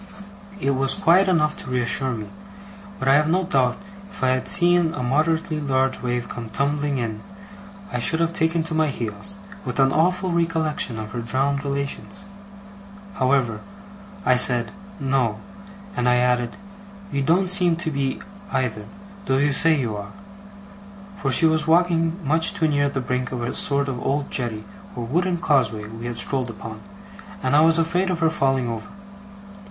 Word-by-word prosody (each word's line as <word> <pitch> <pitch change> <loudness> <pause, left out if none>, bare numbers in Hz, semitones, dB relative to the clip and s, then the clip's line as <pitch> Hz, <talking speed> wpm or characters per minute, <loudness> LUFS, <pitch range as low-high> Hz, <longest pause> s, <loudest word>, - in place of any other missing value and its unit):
It 140 - +1
was 135 0 +2
quiet 190 0 +4
enough 155 -4 +2
to - - -6
reassure 125 +1 0
me, 110 -2 -5 0.7
but 135 - -4
I 135 - +6
have 150 +2 +3
no 185 +3 +2
doubt 130 -8 +1 0.3
if 200 - -9
I 130 - +3
had 130 0 0
seen 175 -3 +3
a 125 - -3
moderately 155 +4 0
large 135 -2 0
wave 120 -1 -2
come 115 -2 -7
tumbling 145 +2 -1
in, 110 -3 -3 0.7
I 125 - -1
should 160 +7 +2
have 165 0 +1
taken 160 0 +1
to 165 0 -3
my 160 0 +2
heels, 120 - -4 0.3
with - - -4
an 135 0 +4
awful 180 +3 +1
recollection 160 -7 -1
of 110 -1 -6
her 120 - -4
drowned 135 +4 0
relations. 140 +8 -4 0.9
However, 130 - +1 0.7
I 125 0 +4
said 120 -2 +5 0.3
'No,' 130 -6 0 0.6
and 125 0 +1
I 125 - +4
added, 125 -1 +1 0.5
'You 140 - -1
don't 175 +7 +2
seem 180 -3 +2
to 160 -1 -2
be 135 -2 -2 0.3
either, 115 -5 -2 0.4
though 130 - +2
you 145 +1 +2
say 160 +2 +3
you 115 -5 -2
are,' 100 0 -8 1.0
for 135 - -2
she 150 +5 +5
was 160 -1 +2
walking 165 0 +2
much 160 +3 +2
too 160 - +1
near 145 -1 +1
the 135 -1 -3
brink 125 0 -2
of 125 -2 -4
a 120 - -2
sort 140 0 +1
of 130 -3 -3
old 140 +2 -1
jetty 115 -4 -2 0.3
or 120 - -4
wooden 175 +8 0
causeway 125 -10 +1
we 115 +2 -7
had 120 -1 -5
strolled 130 0 +1
upon, 110 0 -8 0.6
and 130 +2 +1
I 150 - +6
was 165 +1 +5
afraid 175 +3 +1
of 180 - 0
her 160 -1 +2
falling 135 -4 +1
over. 115 -2 -5
140 Hz, 175 wpm, -22 LUFS, 125-160 Hz, 1.0 s, I